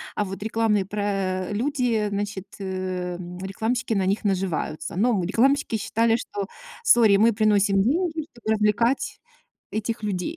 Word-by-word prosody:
а 210 Hz, -, +1 dB
вот 195 Hz, 0 st, -7 dB
рекламные 215 Hz, -3 st, +1 dB
про 195 Hz, -2 st, -2 dB
люди, 240 Hz, -2 st, 0 dB
значит, 200 Hz, -1 st, -4 dB
эм, 180 Hz, -2 st, -4 dB
рекламщики 225 Hz, +5 st, -2 dB
на 195 Hz, -3 st, +1 dB
них 200 Hz, +3 st, 0 dB
наживаются. 185 Hz, -5 st, -2 dB
Но 235 Hz, +5 st, +3 dB
мы, 185 Hz, -4 st, 0 dB
рекламщики, 255 Hz, +6 st, +2 dB
считали, 225 Hz, +2 st, +1 dB
что, 205 Hz, -4 st, -4 dB, 0.4 s
sorry, 220 Hz, -4 st, +6 dB
мы 225 Hz, +2 st, +4 dB
приносим 205 Hz, -2 st, +3 dB
деньги, 315 Hz, -, 0 dB
чтобы 225 Hz, -2 st, -2 dB
развлекать 220 Hz, +5 st, +1 dB, 0.5 s
этих 220 Hz, +1 st, -3 dB
людей, 205 Hz, -, -2 dB
210 Hz, 140 wpm, -24 LUFS, 190-230 Hz, 0.5 s, sorry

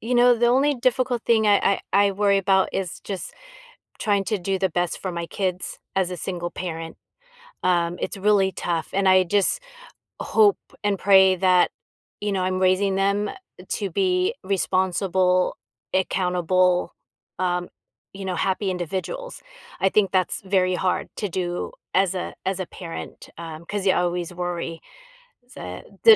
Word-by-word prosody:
you 245 Hz, +3 st, -2 dB
know, 245 Hz, 0 st, +6 dB
the 240 Hz, +1 st, +2 dB
only 275 Hz, +4 st, +3 dB
difficult 250 Hz, -1 st, 0 dB
thing 220 Hz, -2 st, +3 dB
I 200 Hz, -1 st, +3 dB
I 200 Hz, 0 st, +5 dB
I -, -, 0 dB
worry 200 Hz, 0 st, +2 dB
'bout 190 Hz, 0 st, +3 dB
is 190 Hz, -3 st, -3 dB
just 195 Hz, -3 st, -6 dB, 0.7 s
trying 200 Hz, -3 st, +1 dB
to 215 Hz, 0 st, -1 dB
do 190 Hz, +1 st, -1 dB
the 190 Hz, -, +1 dB
best 175 Hz, 0 st, -1 dB
for 185 Hz, -, -3 dB
my 170 Hz, 0 st, -4 dB
kids 185 Hz, -1 st, -3 dB, 0.2 s
as 185 Hz, -1 st, +1 dB
a 180 Hz, -, -4 dB
single 175 Hz, 0 st, -4 dB
parent. 165 Hz, -3 st, -6 dB, 0.7 s
Um, 175 Hz, -1 st, +1 dB
it's -, -, -3 dB
really 195 Hz, -1 st, +3 dB
tough, 170 Hz, -2 st, -2 dB
and 195 Hz, 0 st, +2 dB
I 185 Hz, 0 st, +6 dB
just 205 Hz, -, +1 dB, 0.6 s
hope 420 Hz, -2 st, +4 dB, 0.3 s
and 200 Hz, -2 st, +1 dB
pray 190 Hz, -1 st, +6 dB
that, 180 Hz, -1 st, +4 dB, 0.5 s
you 205 Hz, -1 st, -1 dB
know, 190 Hz, -1 st, 0 dB
I'm 185 Hz, 0 st, 0 dB
raising 190 Hz, +1 st, +3 dB
them 200 Hz, +1 st, +1 dB, 0.4 s
to 200 Hz, -3 st, -2 dB
be 185 Hz, 0 st, +1 dB
responsible, 185 Hz, -1 st, +1 dB, 0.4 s
accountable, 180 Hz, -1 st, +1 dB, 0.4 s
um, 180 Hz, -1 st, -1 dB, 0.5 s
you 195 Hz, 0 st, -7 dB
know, 185 Hz, -, -1 dB
happy 190 Hz, 0 st, 0 dB
individuals. 190 Hz, -, -4 dB, 0.4 s
I 190 Hz, -, +4 dB
think 205 Hz, -3 st, +3 dB
that's 185 Hz, 0 st, 0 dB
very 185 Hz, -1 st, +2 dB
hard 185 Hz, 0 st, -1 dB
to 205 Hz, -, -2 dB
do 175 Hz, 0 st, -3 dB, 0.2 s
as 190 Hz, -1 st, +3 dB
a 180 Hz, -, -4 dB
as 190 Hz, 0 st, -1 dB
a 185 Hz, -, -3 dB
parent, 170 Hz, -2 st, -8 dB
um, 165 Hz, -1 st, -8 dB
'cause 205 Hz, -1 st, -3 dB
you 190 Hz, -, +6 dB
always 175 Hz, 0 st, -1 dB
worry. 170 Hz, -2 st, -4 dB, 0.7 s
So, -, -, -8 dB, 0.2 s
the 450 Hz, -1 st, +10 dB
190 Hz, 160 wpm, -23 LUFS, 180-200 Hz, 0.7 s, the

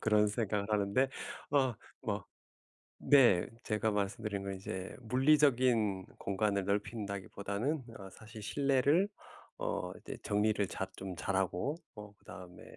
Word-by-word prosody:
그런 105 Hz, -1 st, +4 dB
생각을 105 Hz, -2 st, -1 dB
하는데 105 Hz, +6 st, +2 dB, 0.4 s
어 130 Hz, -4 st, +3 dB, 0.3 s
뭐 -, -, -1 dB, 0.8 s
네. 120 Hz, -11 st, +6 dB, 0.2 s
제가 110 Hz, 0 st, +1 dB
말씀드린 105 Hz, 0 st, -2 dB
건 100 Hz, 0 st, -3 dB
이제 95 Hz, 0 st, -6 dB
물리적인 125 Hz, -6 st, +3 dB
공간을 100 Hz, 0 st, 0 dB
넓힌다기보다는 100 Hz, +5 st, -2 dB
어 95 Hz, -1 st, -9 dB
사실 110 Hz, +2 st, -11 dB
실내를 140 Hz, -, +3 dB, 0.5 s
어 -, -, -2 dB
이제 -, -, -7 dB
정리를 105 Hz, -1 st, +2 dB
잘 -, -, -3 dB
좀 95 Hz, -2 st, -6 dB
잘하고 95 Hz, -, 0 dB, 0.2 s
어 105 Hz, -1 st, -10 dB
그다음에 90 Hz, -1 st, -11 dB
105 Hz, 265 characters per minute, -33 LUFS, 100-125 Hz, 0.8 s, 네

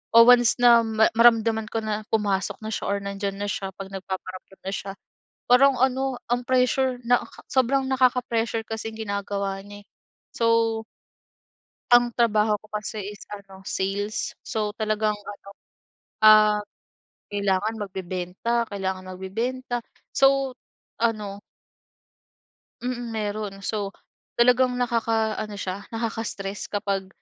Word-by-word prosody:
o, 230 Hz, -, +11 dB
once 245 Hz, -1 st, +6 dB
na 235 Hz, -1 st, +8 dB
ma 220 Hz, 0 st, +3 dB
maramdaman 225 Hz, -2 st, +4 dB
ko 225 Hz, -, -1 dB
na 215 Hz, 0 st, -2 dB
pumasok 200 Hz, -3 st, 0 dB
na 220 Hz, -, -4 dB
siya -, -, -3 dB
or 200 Hz, -, +1 dB
nandiyan 200 Hz, 0 st, -3 dB
na 205 Hz, -, -2 dB
siya 195 Hz, -1 st, -4 dB
'pag 195 Hz, 0 st, -8 dB
nagpaparamdam 190 Hz, 0 st, -7 dB
na 195 Hz, -, -2 dB
siya, 195 Hz, 0 st, -4 dB, 0.6 s
parang 270 Hz, +2 st, +6 dB
ano, 265 Hz, 0 st, +1 dB, 0.2 s
ang 245 Hz, 0 st, +1 dB
pressure 255 Hz, 0 st, +2 dB
nakaka 245 Hz, 0 st, +1 dB
sobrang 265 Hz, +1 st, +2 dB
nakaka-pressure 245 Hz, -3 st, +1 dB
kasing 225 Hz, 0 st, -5 dB
ginagawa 200 Hz, -2 st, -3 dB
niya 205 Hz, 0 st, -11 dB
eh. -, -, -46 dB, 0.5 s
So 230 Hz, -1 st, +2 dB, 1.1 s
Ang 240 Hz, 0 st, +5 dB
trabaho 215 Hz, -2 st, +3 dB
ko 215 Hz, -, -19 dB
kasi 210 Hz, +1 st, -4 dB, 0.2 s
is -, -, -14 dB
ano 195 Hz, -2 st, -10 dB
sales. 200 Hz, +3 st, -2 dB
So 210 Hz, -1 st, -2 dB
talagang 215 Hz, -1 st, 0 dB
ano 205 Hz, -1 st, -11 dB, 0.8 s
ah, 215 Hz, -1 st, +7 dB, 0.8 s
kailangan 200 Hz, +2 st, +1 dB
magbebenta, 190 Hz, +4 st, -2 dB
kailangan 190 Hz, -2 st, -4 dB
magbebenta, 235 Hz, +7 st, -3 dB, 0.3 s
so 270 Hz, -1 st, +3 dB, 0.5 s
ano 210 Hz, -3 st, -1 dB, 1.4 s
Mm, 245 Hz, -1 st, -3 dB
meron. 210 Hz, -2 st, -3 dB
So 205 Hz, -2 st, -2 dB, 0.5 s
talagang 250 Hz, +1 st, +4 dB
nakakaano 225 Hz, -3 st, 0 dB
siya, 195 Hz, 0 st, -5 dB
nakaka-stress 225 Hz, -3 st, -4 dB
kapag 195 Hz, -2 st, -2 dB
215 Hz, 120 wpm, -25 LUFS, 200-235 Hz, 1.4 s, o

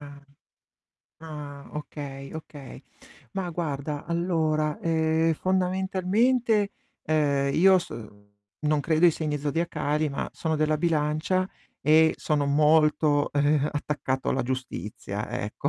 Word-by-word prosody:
Ah, 145 Hz, -1 st, -11 dB, 1.0 s
ah, 150 Hz, -3 st, -9 dB
okay, 140 Hz, -2 st, -7 dB
okay. 150 Hz, -3 st, -9 dB, 0.5 s
Ma 190 Hz, -2 st, -3 dB
guarda, 150 Hz, -3 st, -3 dB
allora, 160 Hz, -3 st, 0 dB
ehm, 160 Hz, 0 st, +2 dB
fondamentalmente, 190 Hz, +5 st, +1 dB, 0.3 s
ehm, 140 Hz, -3 st, +1 dB
io 190 Hz, +2 st, +6 dB
s -, -, -7 dB, 0.7 s
non 150 Hz, 0 st, +1 dB
credo 160 Hz, +3 st, +2 dB
ai 175 Hz, -, +8 dB
segni 150 Hz, -2 st, -2 dB
zodiacali, 150 Hz, 0 st, -1 dB
ma 140 Hz, -, -3 dB
sono 160 Hz, -1 st, -2 dB
della 155 Hz, 0 st, +2 dB
Bilancia 160 Hz, +3 st, 0 dB, 0.3 s
e 160 Hz, +2 st, +5 dB
sono 145 Hz, -2 st, 0 dB
molto, 150 Hz, 0 st, +3 dB
ehm, 145 Hz, 0 st, +2 dB
attaccato 145 Hz, -3 st, -2 dB
alla 130 Hz, -, 0 dB
giustizia, 120 Hz, -5 st, -5 dB
ecco. 120 Hz, +3 st, -3 dB
155 Hz, 110 wpm, -26 LUFS, 145-170 Hz, 1.0 s, ai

